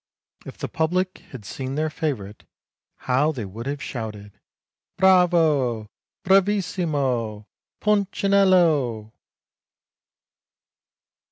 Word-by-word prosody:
If - - -9
the - - -4
public 185 +3 -1
had 120 -7 -10
seen 130 +6 -5
their 155 +1 -1
favourite, 120 - -4 0.6
how 135 +5 +2
they 125 -8 -5
would 110 +6 -8
have 140 0 -4
shouted, 105 -4 -6 0.4
' - - -64
Bravo! 160 - +3 0.3
Bravissimo! 160 - +1 0.3
Punchinello.' 185 - +2
145 Hz, 85 wpm, -23 LUFS, 115-180 Hz, 0.6 s, Bravo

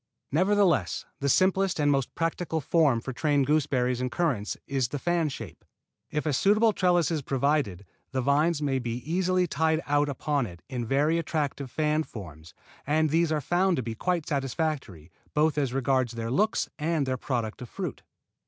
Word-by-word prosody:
Nevertheless 175 - +2
the 140 - 0
simplest 190 +3 +2
and 145 -1 +3
most 135 -3 -1
practical 165 0 -1
form 145 -5 +2
for 130 - -5
trained 145 0 +1
gooseberries 130 -4 +1
and 125 -1 -2
currants 130 -12 -1
is 135 -3 0
the 145 - -4
fan 170 +1 0
shape. 110 - -8 0.5
If 150 +1 -2
a 150 - +1
suitable 210 - +4
trellis 175 -3 +2
is 160 -3 -1
provided, 135 - 0 0.3
the 130 -1 -1
vines 150 +3 +2
may 135 -2 +1
be 120 -2 -3
easily 185 +2 +2
tied 160 0 +1
out 145 0 +2
upon 140 -2 -1
it 85 -2 -12
in 120 -3 -4
very 150 +6 +2
attractive 145 -4 -2
fan 150 +3 +1
forms 80 - -10 0.3
and 155 +1 +2
these 165 0 +2
are 155 -1 +1
found 180 +5 +2
to 130 - -1
be 115 0 -4
quite 170 +7 -1
satisfactory, 135 - -3 0.2
both 150 +1 +3
as 140 -4 0
regards 130 -2 +1
their 115 0 -4
looks 210 - +1
and 155 -1 0
their 130 -1 -1
product 120 -4 -3
of 125 - -7
fruit. - - -5
145 Hz, 175 wpm, -27 LUFS, 125-165 Hz, 0.5 s, suitable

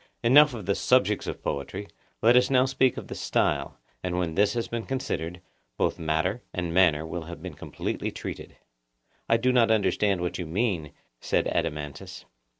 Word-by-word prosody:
Enough 140 +3 +6
of 105 -5 -7
the 100 - +2
subjects 105 -3 +2
of - - -5
poetry: 95 +9 -4 0.4
let 120 - +6
us 125 0 +5
now 130 -1 +4
speak 130 -1 +2
of - - -6
the - - -6
style; - - 0 0.2
and 90 -1 -2
when 85 -3 -1
this 100 +4 +2
has 115 - -1
been 115 -1 -4
considered, 90 -10 -3 0.4
both - - 0
matter 80 +8 0
and 90 -2 -2
manner 85 -4 +4
will 80 0 -5
have 85 +1 -9
been - - -6
completely - - -4
treated. - - -8 0.7
I 115 - +5
do 130 +2 +2
not 120 -3 +4
understand 105 -3 +2
what 90 +1 -3
you 90 - -4
mean, 85 -5 -1 0.3
said - - 0
Adeimantus. 75 -1 -4
100 Hz, 175 wpm, -27 LUFS, 85-120 Hz, 0.7 s, Enough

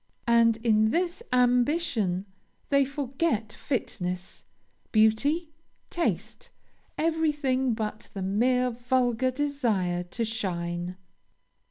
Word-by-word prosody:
And, 230 -1 +4
in 220 -2 +4
this 345 - -1
ambition, 245 - +2 0.4
they 280 -1 +4
forget 270 -4 -2
fitness, 180 -9 -4 0.5
beauty, 280 +10 +3 0.4
taste, 485 +7 -2 0.5
everything 295 -6 +1
but 215 -1 -5
the 195 - -3
mere 250 +6 +2
vulgar 245 +1 +1
desire 240 -11 0
to 230 +6 -3
shine. 175 -4 -3
240 Hz, 85 wpm, -27 LUFS, 215-280 Hz, 0.5 s, And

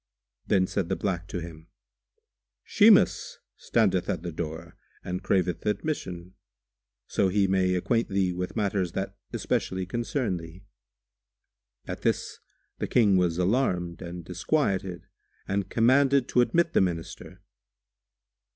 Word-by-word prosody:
Then 95 -3 +3
said 90 -2 -2
the - - +1
black 90 -3 -2
to 90 - -4
him, 80 -1 -10 1.0
"Shimas - - +4 0.2
standeth - - +1
at - - -2
the 85 - -4
door 80 +1 -6 0.3
and 90 +1 -4
craveth 90 -2 0
admission, 95 - -3 0.7
so 100 - +1
he 100 +1 +2
may 95 -1 +2
acquaint 115 +6 0
thee 95 -2 +1
with 90 +1 -4
matters 100 -5 -1
that 95 +1 -3 0.2
specially 95 0 -1
concern 120 0 -2
thee." 85 +3 -11 1.2
At - - -6
this - - -1 0.4
the - - -2
King 105 -5 +4
was 90 -2 +2
alarmed 90 -4 0
and 85 -1 -7
disquieted 95 - -1 0.4
and 100 -1 -1
commanded 130 +3 +3
to 125 - +4
admit 170 +6 +2
the - - +4
Minister. 85 -3 -4
95 Hz, 125 wpm, -27 LUFS, 90-105 Hz, 1.2 s, Shimas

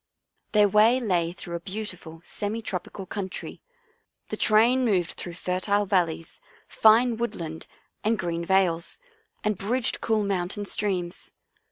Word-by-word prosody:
Their 210 -1 +6
way 215 +5 +5
lay 175 -8 +1
through 175 -1 -7
a 170 - -2
beautiful 185 -4 -7
semi 220 +2 -4
trop 180 -4 -3
ical 190 -2 -9
country. 190 -2 -5 0.7
The - - -2
train 235 +4 +4
moved 190 -7 +2
through 175 -1 -7
fertile 185 +3 0
valleys, 170 -4 0 0.3
fine 225 +2 +5
woodland 165 -9 -4 0.4
and 220 +1 +2
green 170 -2 -2
vales, 175 -2 +1 0.5
and 210 -3 0
bridged 235 +4 -1
cool 220 -2 +1
mountain 200 +1 -2
streams. 190 -4 -2
195 Hz, 135 wpm, -26 LUFS, 175-215 Hz, 0.7 s, Their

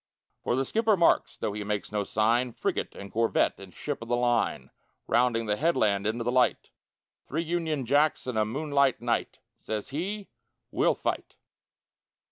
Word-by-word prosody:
For - - +1
the 135 +1 0
skipper 220 - +2
marks, 170 - +3
tho' 105 - -2
he 105 0 -4
makes 105 0 -3
no 105 -1 0
sign, 115 +4 +1
Frigate - - -2
and 100 0 -9
corvette 115 +1 +1
and 95 -1 -11
ship 145 +5 -5
of 115 - -7
the 120 - +1
line, 120 -1 0 0.3
Rounding 120 -1 +2
the 105 -1 0
headland 105 -10 +2
into 115 +2 -1
the 120 - 0
light: 125 0 +2 0.6
"Three 160 +4 -1
Union 160 -5 -1
Jacks 145 +3 +2
and 125 -2 -3
a 110 - +3
moonlight 140 +3 +1
night!" 120 0 -1 0.2
Says 110 -1 -4
he, 195 +8 -4 0.4
"We'll - - +2
fight!" - - -3
120 Hz, 165 wpm, -28 LUFS, 110-150 Hz, 0.6 s, marks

